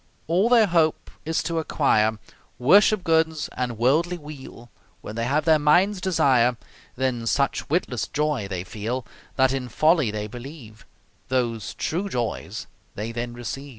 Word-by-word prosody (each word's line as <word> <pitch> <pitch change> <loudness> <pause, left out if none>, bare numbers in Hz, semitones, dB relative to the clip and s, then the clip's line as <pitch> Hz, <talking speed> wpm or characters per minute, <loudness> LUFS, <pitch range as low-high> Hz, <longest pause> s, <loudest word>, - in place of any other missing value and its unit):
All 185 +8 +2
their 235 -3 +6
hope 165 -4 +1
is 160 +1 -1
to 165 -1 -1
acquire 110 -8 +1 0.4
Worship 195 - +5
goods 160 -2 +1
and 125 -2 -3
worldly 155 +9 +2
weal; 140 -6 -11 0.3
When 105 - -8
they 115 0 -1
have 145 +5 0
their 160 -2 +5
mind's 180 +7 +3
desire, 130 -10 +3 0.4
Then 125 -3 -1
such 140 +4 0
witless 125 - -1
Joy 150 -8 -1
they 95 -3 -4
feel, 110 +6 -4 0.3
That 130 0 +3
in 130 -2 -3
folly 155 +1 +3
they 105 0 -3
believe 120 -1 -11 0.4
Those 120 -4 -2
True 185 +5 -2
Joys 120 - -3 0.3
they 110 +3 -4
then 120 +1 -5
receive. 135 +4 -6
135 Hz, 150 wpm, -24 LUFS, 120-160 Hz, 0.4 s, their